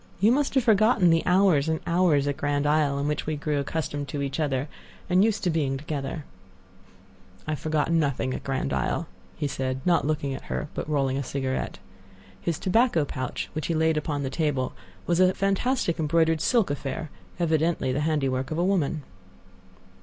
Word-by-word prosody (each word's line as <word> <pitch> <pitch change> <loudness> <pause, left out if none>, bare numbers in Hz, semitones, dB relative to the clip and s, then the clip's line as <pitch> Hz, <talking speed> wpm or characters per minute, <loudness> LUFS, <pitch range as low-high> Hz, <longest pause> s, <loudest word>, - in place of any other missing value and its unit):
You 210 +5 +5
must 280 +2 +1
have 265 - +4
forgotten 215 -5 +4
the 165 0 +4
hours 180 -5 +4
and 160 0 0
hours 170 -5 +3
at 145 - 0
Grand 145 0 -1
Isle 145 -1 +2
in 140 +1 -1
which 150 0 -2
we 155 - 0
grew 150 0 -1
accustomed 145 0 -3
to 140 +1 -3
each 140 +3 -3
other 140 -2 0 0.4
and 185 +2 +4
used 220 -1 +1
to 180 - +2
being 140 -4 0
together." 145 +1 -4 1.2
"I 155 - -3
have 150 - -2
forgotten 155 +1 +1
nothing 135 -3 0
at - - -5
Grand 135 - -2
Isle," 70 -2 -1 0.3
he 145 - -2
said, 130 -1 -2
not 170 -4 +3
looking 150 -3 -1
at 135 - -7
her, 150 - -3
but - - -4
rolling 135 -3 +1
a - - -2
cigarette. 130 0 -3 0.6
His 170 -3 -1
tobacco 190 - +2
pouch, 130 -2 -4
which 155 -2 -3
he 165 - 0
laid 160 0 +2
upon 150 -2 -2
the 135 - -3
table, 145 -4 -1 0.3
was 175 0 +1
a 185 0 +4
fantastic 195 -2 0
embroidered 160 0 +2
silk 230 - +2
affair, 145 +2 -4 0.3
evidently 160 -4 +1
the 130 - -1
handiwork 135 -4 0
of 155 - -3
a 175 - +2
woman. 160 -6 0
155 Hz, 185 wpm, -26 LUFS, 140-170 Hz, 1.2 s, You